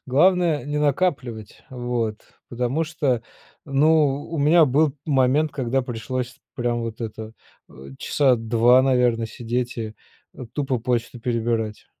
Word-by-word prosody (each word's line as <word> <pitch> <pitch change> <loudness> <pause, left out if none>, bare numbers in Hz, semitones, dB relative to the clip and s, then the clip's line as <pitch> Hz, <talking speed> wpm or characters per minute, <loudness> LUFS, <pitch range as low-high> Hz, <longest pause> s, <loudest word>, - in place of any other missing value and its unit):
Главное 170 +3 +3
не 145 +1 -2
накапливать, 135 - -1
вот, 120 -3 -3 0.3
потому 125 +6 -1
что, 140 -7 -1 0.4
ну 145 0 +3
у 165 - -3
меня 155 +4 +5
был 145 +1 +2
момент, 140 +2 +2
когда 135 -2 -1
пришлось 125 +1 -5 0.2
прям 120 -1 -1
вот 115 0 -6
это, 110 -1 -6 0.4
э, - - -19 0.3
часа 135 -4 +2
два 115 +3 +4
наверно 125 -3 +2
сидеть 120 +2 -3
и, 110 -2 -5 0.4
э, 125 - -8
тупо 135 -4 -1
почту 120 +1 -2
перебирать. 115 -2 -2
125 Hz, 130 wpm, -23 LUFS, 115-145 Hz, 0.4 s, меня